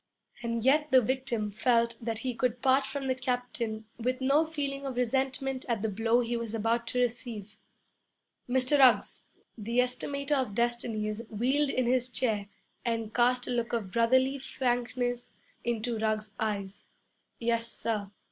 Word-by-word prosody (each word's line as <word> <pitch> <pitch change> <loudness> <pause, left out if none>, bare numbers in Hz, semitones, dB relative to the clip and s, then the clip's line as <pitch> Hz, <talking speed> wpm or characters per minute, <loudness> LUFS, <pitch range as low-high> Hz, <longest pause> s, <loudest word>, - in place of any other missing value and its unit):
And 230 -1 -2
yet 300 +3 +4
the 260 -1 +7
victim 240 -3 -1
felt 235 +2 +2
that 225 -1 -2
he 255 - 0
could 245 +1 -1
part 265 +1 +4
from 280 -1 -4
the 260 - +2
captain 245 -3 -3
with 255 +2 -1
no 280 +4 +3
feeling 280 -3 -3
of 270 -2 -4
resentment 265 +1 0
at 225 -3 0
the 220 - +1
blow 225 +4 +2
he 240 0 -2
was 230 -1 -3
about 230 +2 0
to 250 - -1
receive. 225 -4 -2 0.9
'Mr. 260 +3 +3
Ruggs!' 260 -2 +4 0.3
The 230 +3 -3
Estimator 280 +3 0
of 260 -8 0
Destinies 230 -2 0
wheeled 265 +7 +1
in 255 -2 +1
his 250 +1 +2
chair 220 -4 0 0.4
and 225 -2 -2
cast 250 +1 +3
a - - -2
look 235 -1 -1
of 210 -5 -2
brotherly 260 +5 +3
frankness 245 -1 -2 0.3
into 235 -1 -1
Ruggs's 215 -1 -1
eyes. 205 -3 -3 0.6
'Yes, 230 0 0
sir.' 210 -3 -2
240 Hz, 155 wpm, -29 LUFS, 225-260 Hz, 0.9 s, the